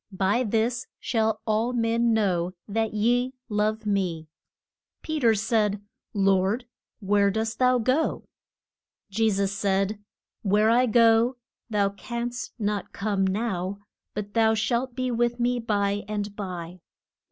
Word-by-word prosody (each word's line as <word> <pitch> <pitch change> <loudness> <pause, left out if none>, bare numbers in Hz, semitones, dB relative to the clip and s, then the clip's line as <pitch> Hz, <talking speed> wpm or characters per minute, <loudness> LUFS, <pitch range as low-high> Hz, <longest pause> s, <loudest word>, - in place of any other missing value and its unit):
By 200 +6 +2
this 230 +2 0
shall 220 -3 0
all 225 +3 +1
men 230 0 +2
know 185 -5 +1
that 220 +1 -1
ye 245 +4 +1
love 215 +1 0
me. 180 -6 -1 0.7
Pe 315 -1 -2
ter 230 -4 +4
said, 210 -1 +1 0.4
Lord, 195 +4 +2 0.4
where 200 0 +3
dost 220 +2 -2
thou 255 0 +4
go? 260 +7 0 0.9
Je 220 +3 +2
sus 195 -1 0
said, 200 +1 0 0.4
Where 210 +2 +3
I 250 +2 +4
go 230 +2 +4 0.3
thou 205 -2 +2
canst 235 +4 -5
not 210 -2 -2
come 200 -2 0
now, 190 -2 -2 0.4
but 205 0 -5
thou 225 -1 +4
shalt 240 +3 -1
be 255 -1 -1
with 240 +1 0
me 245 +1 +1
by 205 -3 0
and 205 -1 -3
by. 180 -3 -6
215 Hz, 130 wpm, -26 LUFS, 200-235 Hz, 0.9 s, ter